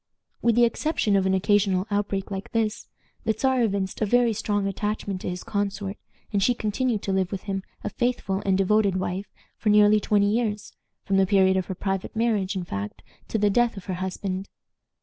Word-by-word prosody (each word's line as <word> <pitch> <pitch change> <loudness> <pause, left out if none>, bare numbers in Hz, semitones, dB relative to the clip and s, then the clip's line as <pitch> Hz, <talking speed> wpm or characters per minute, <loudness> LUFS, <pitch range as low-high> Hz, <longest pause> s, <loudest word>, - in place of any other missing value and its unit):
With 235 -2 +3
the 240 0 +6
exception 230 -3 0
of 190 -1 +3
an 190 - +3
occasional 190 -1 +2
outbreak 205 -1 -1
like 195 +3 -6
this, 225 -1 -1 0.4
the 220 - +1
Czar 260 +1 +2
evinced 200 -4 -1
a - - +3
very 240 +1 +3
strong 205 -1 -1
attachment 200 -1 -2
to - - -3
his 180 0 -5
consort, 200 -1 -2 0.4
and 200 - +2
she 245 +5 +3
continued 220 0 -1
to 195 - -1
live 190 -2 0
with 195 -2 -4
him 195 -1 -3 0.2
a - - -2
faithful 225 -5 -1
and 190 -1 +2
devoted 200 0 +3
wife 185 +1 -2 0.3
for 215 - 0
nearly 210 0 +6
twenty 205 0 +2
years; 215 -3 -1 0.3
from 195 - +1
the 190 0 +4
period 190 -1 +4
of 185 -2 0
her 190 - -4
private 195 +2 -3
marriage, 215 -4 +1
in 185 - -2
fact, 100 - -6 0.2
to - - -1
the 205 -1 +3
death 240 0 +2
of 195 - -8
her 190 - -3
husband. 190 +1 -3
200 Hz, 200 wpm, -25 LUFS, 190-215 Hz, 0.4 s, the